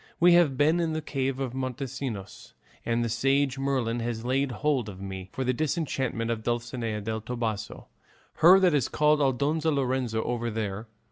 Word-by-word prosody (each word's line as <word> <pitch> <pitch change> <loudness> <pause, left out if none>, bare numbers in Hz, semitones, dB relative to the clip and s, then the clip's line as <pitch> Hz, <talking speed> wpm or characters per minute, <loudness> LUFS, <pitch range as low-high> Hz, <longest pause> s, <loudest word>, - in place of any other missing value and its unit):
We 175 +1 +6
have 165 -7 +4
been 155 +5 +3
in 165 -2 0
the 155 - -2
cave 135 -2 -2
of 130 -3 -3
Montesinos, 130 -5 -5 0.3
and 120 0 0
the - - 0
sage 135 +3 +1
Merlin 130 -4 0
has 115 0 -3
laid 135 +2 +1
hold 130 -2 0
of 95 -2 -9
me 95 -1 -7
for 130 - -3
the 130 0 +1
disenchantment 135 -5 -1
of 115 -1 -2
Dulcinea 120 -2 -2
del 110 +2 -3
Toboso, 110 -2 -4 0.5
her 180 +4 +8
that 180 -3 +4
is 140 -5 +1
called 150 0 +3
Aldonza 145 +4 +1
Lorenzo 130 -5 0
over 120 -1 -2
there. 110 -1 -4
130 Hz, 175 wpm, -27 LUFS, 115-140 Hz, 0.5 s, her